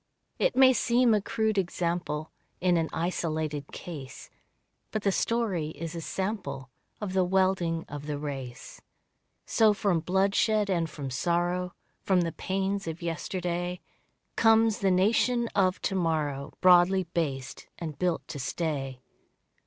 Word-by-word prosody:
It - - +2
may 260 0 +7
seem 245 -1 +3
a 210 - +3
crude 220 0 0
example, 170 -3 -2 0.3
In 180 -1 +3
an 165 -1 +1
isolated 155 -4 -2
case, 140 -6 -8 0.6
But 215 -1 -3
the 200 - +3
story 195 -8 0
is 165 0 -5
a 170 - -5
sample 155 - -4 0.3
Of 205 -3 -4
the 190 -1 +3
welding 180 -3 +1
of 145 0 -7
the 150 -1 -2
race. 135 -4 -7 0.6
So 215 -2 +4
from 195 -4 +1
bloodshed 195 +4 +2
and 170 -3 0
from 140 -3 -6
sorrow, 175 +6 0 0.3
From 185 -2 +2
the 165 -1 -1
pains 195 +1 -2
of 165 +1 -5
yesterday, 175 +1 -3 0.6
Comes 225 -1 +4
the 195 -3 +2
nation 230 +6 +3
of 185 -1 +2
to - - 0
morrow 155 -6 -1
Broadly 185 +1 +6
based 145 -7 -3
and 155 -4 -6
built 180 -2 0
to 145 - -5
stay. 135 -3 -3
175 Hz, 135 wpm, -28 LUFS, 155-195 Hz, 0.6 s, may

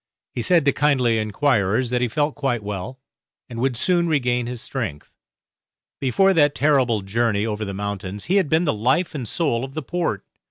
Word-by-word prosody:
He 120 - -3
said 170 +4 +3
to 140 - +5
kindly 130 -6 +2
enquirers 110 0 +1
that 125 -1 0
he 125 - +2
felt 145 +5 0
quite 135 -6 -2
well, 105 +5 -5 0.5
and 115 -2 -7
would 130 -1 0
soon 175 +4 +2
regain 125 -6 0
his 125 -1 -5
strength. 110 - -5 0.9
Before 190 +9 +3
that 145 -4 +3
terrible 130 -7 +2
journey 105 +1 0
over 110 -1 -3
the 100 -2 -5
mountains 100 -1 -5
he 190 +4 +2
had 185 -7 +1
been 160 +2 +3
the 150 - +1
life 130 - +1
and 130 -6 -5
soul 130 -7 0
of 135 0 -7
the 155 - -3
Port. 175 +6 -2
125 Hz, 190 wpm, -22 LUFS, 110-145 Hz, 0.9 s, to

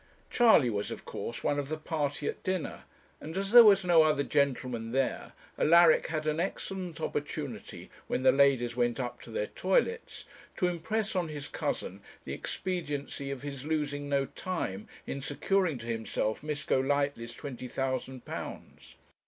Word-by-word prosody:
Charley 220 - +5
was, 105 -1 -2
of - - -7
course, 120 - -5
one 145 - +1
of 140 -1 -4
the 155 - -2
party 150 -2 -2
at - - -3
dinner; 185 -3 -3 0.3
and 160 +4 -7
as 195 +1 -1
there 240 0 +11
was 200 -3 +6
no 170 -2 +6
other 155 -2 +3
gentleman 125 -5 0
there, 135 0 -1 0.3
Alaric 170 0 +6
had 155 -1 -2
an 155 +1 0
excellent 185 -1 -3
opportunity, - - -5 0.2
when 130 - -1
the - - +7
ladies 135 -4 +3
went 120 0 +1
up 125 -2 -4
to - - -11
their - - -1
toilets, 470 -1 -1 0.3
to 180 - +2
impress 205 +5 -2
on 180 -2 +1
his 150 -2 -6
cousin 95 +2 -3 0.2
the - - -4
expediency 145 -6 -3
of 140 -1 -5
his 140 -2 -6
losing 145 -2 -2
no 140 -1 +2
time 135 - -4 0.2
in 140 - -4
securing 165 +3 +1
to 115 - -9
himself 110 -1 -2
Miss 150 -1 -3
Golightly's 140 -3 0
twenty 130 -3 -7
thousand 130 0 -3
pounds. - - -8
145 Hz, 160 wpm, -30 LUFS, 130-175 Hz, 0.3 s, there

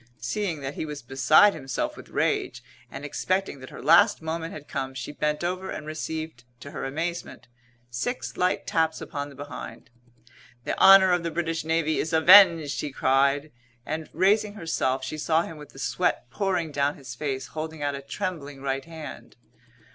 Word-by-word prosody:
Seeing 165 - -3
that 135 +1 -4
he - - -4
was 150 -3 -6
beside 135 +11 +5
himself 135 -4 -3
with - - -12
rage - - -1 0.3
and 135 +2 -8
expecting 185 +1 -2
that 130 - -10
her - - -10
last 175 +9 +6
moment 165 +1 -4
had 150 -1 -10
come, 130 0 -4
she 130 - -5
bent 150 +1 -2
over 185 +2 -2
and 155 - -6
received, 155 -4 -5 0.2
to 140 - -9
her - - -5
amazement, 165 +4 -4 0.4
six 245 - -3
light 180 0 0
taps 160 -1 0
upon 145 0 -5
the 140 - -14
behind. 145 -2 -9 0.7
"The - - -2
honour 195 -1 +8
of 175 -1 +2
the 170 - -2
British 165 -1 -2
Navy 160 -1 0
is 160 - -2
avenged!" 165 -2 +7
he 150 - -4
cried, 140 +3 +2 0.3
and, 155 0 -4
raising 205 +4 +2
herself, 135 -8 -1
she 155 - -5
saw 160 +2 +2
him 165 - -8
with 150 -1 -11
the - - -17
sweat 175 -2 -1
pouring 180 -1 -1
down 145 0 0
his 130 -3 -9
face 135 0 -4
holding 160 -1 -5
out 145 0 0
a 140 - -5
trembling 145 -2 -5
right 135 0 -2
hand. 160 -2 -10
155 Hz, 175 wpm, -26 LUFS, 140-170 Hz, 0.7 s, honour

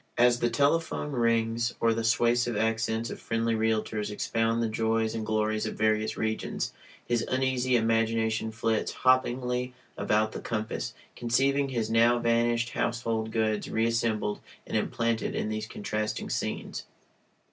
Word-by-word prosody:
As 120 0 +5
the 120 - +2
telephone 150 +1 +1
rings, 115 -1 +1
or 115 0 +3
the 115 0 -2
suasive 120 0 +2
accents 115 +1 0
of - - -7
friendly 115 0 0
realtors 110 -1 0
expound 115 +2 0
the - - +1
joys 110 0 0
and 115 -1 -3
glories 110 0 0
of - - -4
various 110 0 +1
regions, 110 0 -2 0.3
his 120 -1 +1
uneasy 130 -1 +1
imagination 115 -1 +1
flits 115 0 0
hoppingly 125 -1 +2 0.3
about 110 +1 +2
the - - -6
compass, 110 -1 -3 0.2
conceiving 135 +4 +1
his 115 -4 -2
now 115 +1 +5
vanished 120 0 +1
household 115 -2 -1
goods 110 -1 0
reassembled 110 -2 0 0.3
and - - -5
implanted 115 -2 0
in - - -1
these 110 0 -3
contrasting 105 0 -3
scenes. - - -3
115 Hz, 135 wpm, -28 LUFS, 110-120 Hz, 0.3 s, As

